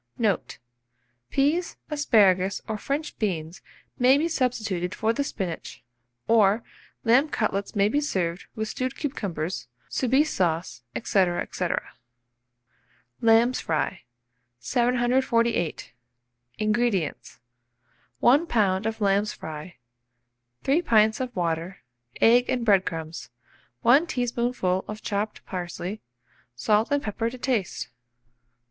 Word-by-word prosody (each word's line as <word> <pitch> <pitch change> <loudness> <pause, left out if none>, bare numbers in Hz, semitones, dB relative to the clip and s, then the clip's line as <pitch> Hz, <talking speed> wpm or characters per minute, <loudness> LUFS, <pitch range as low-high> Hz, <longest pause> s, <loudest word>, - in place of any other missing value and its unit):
Note. 210 -6 0 0.7
Peas, 305 +6 +1
asparagus, 200 -10 +3
or 220 - -2
French 290 +6 -3
beans, 170 -5 -2 0.4
may 255 +2 +6
be 315 +3 +1
substituted 220 - -1
for 220 +1 +1
the 280 - 0
spinach; 185 - -5 0.4
or 220 0 +4 0.4
lamb 250 +6 +4
cutlets 205 -6 -2
may 200 0 +4
be 285 +7 +1
served 180 - -2
with 220 0 -2
stewed 255 +4 -3
cucumbers, 190 - -4 0.2
Soubise 265 +4 +2
sauce, 165 -7 -1
&c. - - -2
&c. 185 -5 0 1.6
LAMB'S 230 +2 +4
FRY. 155 -2 -1 0.6
748. 240 - +1 0.6
INGREDIENTS. 215 -5 -1 0.8
1 280 - +4
lb. 205 -5 +1
of 225 0 -4
lamb's 200 +1 +2
fry, 155 +2 -8 0.9
3 285 +6 +3
pints 220 -8 +3
of 255 -1 -4
water, 170 0 -2 0.4
egg 245 +2 +5
and 245 -2 0
bread 195 -4 +4
crumbs, 165 -1 -5 0.5
1 280 +8 +5
teaspoonful 240 - -1
of 215 0 -7
chopped 205 +1 -3
parsley, 180 +2 -5 0.5
salt 210 - +2
and 285 -1 +1
pepper 225 +2 -2
to 255 - -9
taste. 240 -7 -2
220 Hz, 110 wpm, -26 LUFS, 185-250 Hz, 1.6 s, may